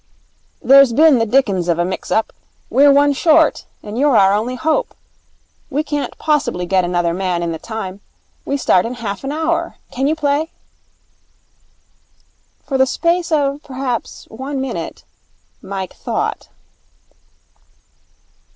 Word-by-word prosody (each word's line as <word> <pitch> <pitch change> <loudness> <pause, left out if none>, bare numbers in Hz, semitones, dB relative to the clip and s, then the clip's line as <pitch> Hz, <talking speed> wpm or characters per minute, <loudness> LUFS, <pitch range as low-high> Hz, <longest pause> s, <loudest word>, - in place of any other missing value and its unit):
'There's 275 -2 +6
been 300 -1 +5
the 225 - +1
dickens 205 -8 +1
of 170 -1 +1
a 175 - +1
mix 185 - -5
up. 220 - 0 0.4
We're 280 +4 +6
one 285 +1 +4
short, 315 +2 +3 0.2
and 210 +3 -5
you're 280 -4 +4
our 195 0 +5
only 225 +5 -1
hope. 320 - -1 0.7
We 295 +3 -1
can't 295 -2 -4
possibly 280 - 0
get 185 +1 +2
another 175 -1 0
man 180 -1 -1
in 170 - -2
the 160 - -5
time. 200 -3 -6 0.4
We 280 - -2
start 185 -8 +3
in 245 - -5
half 210 -3 -5
an 270 - -3
hour. 320 +2 -1 0.2
Can 265 +2 -1
you 310 - +1
play?' 300 +1 0 2.2
For 270 -2 -2
the 265 - +4
space 340 +5 0
of, 285 -2 +1
perhaps, 260 -4 -5
one 265 +4 -5
minute, 265 0 -5 0.6
Mike 190 -1 -6
thought. - - -3
265 Hz, 140 wpm, -18 LUFS, 200-290 Hz, 2.2 s, There's